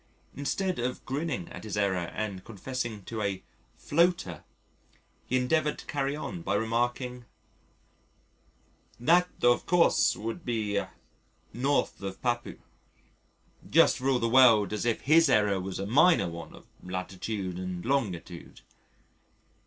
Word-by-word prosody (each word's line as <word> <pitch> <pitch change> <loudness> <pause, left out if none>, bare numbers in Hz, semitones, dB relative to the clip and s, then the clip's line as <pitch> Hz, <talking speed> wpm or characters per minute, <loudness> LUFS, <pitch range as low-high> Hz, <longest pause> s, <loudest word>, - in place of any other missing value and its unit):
Instead 185 +6 -2
of 125 +1 -3
grinning 135 - -3
at - - -9
his 105 -2 -5
error 95 -4 0
and 100 -4 -4
confessing 115 -1 -5
to 110 +3 -5
a 100 -2 -2 0.3
"floater," 165 - +1 0.8
he 130 - +1
endeavoured 150 +4 +1
to - - -11
carry 140 0 -2
on 170 +3 -6
by - - -1
remarking, 120 +2 -1 1.7
"That 175 +8 +4
of 120 0 +3
course 175 -1 +4
would 115 +10 -5
be 110 -4 -1
N. - - -5 0.8
of 100 -9 -1
Papua," 120 -1 -2 1.1
just - - +5
for 130 +1 0
all 130 - +3
the 115 - 0
world 115 -4 +5
as 105 +3 -2
if 115 - 0
his 160 +4 +5
error 105 -2 +3
was 95 0 -5
a 95 - -3
minor 145 - +4
one 85 -1 -9
of - - -16 0.2
latitude 95 +1 -4
and 90 -1 -5
longitude. 95 -10 -3
115 Hz, 130 wpm, -28 LUFS, 100-135 Hz, 1.7 s, just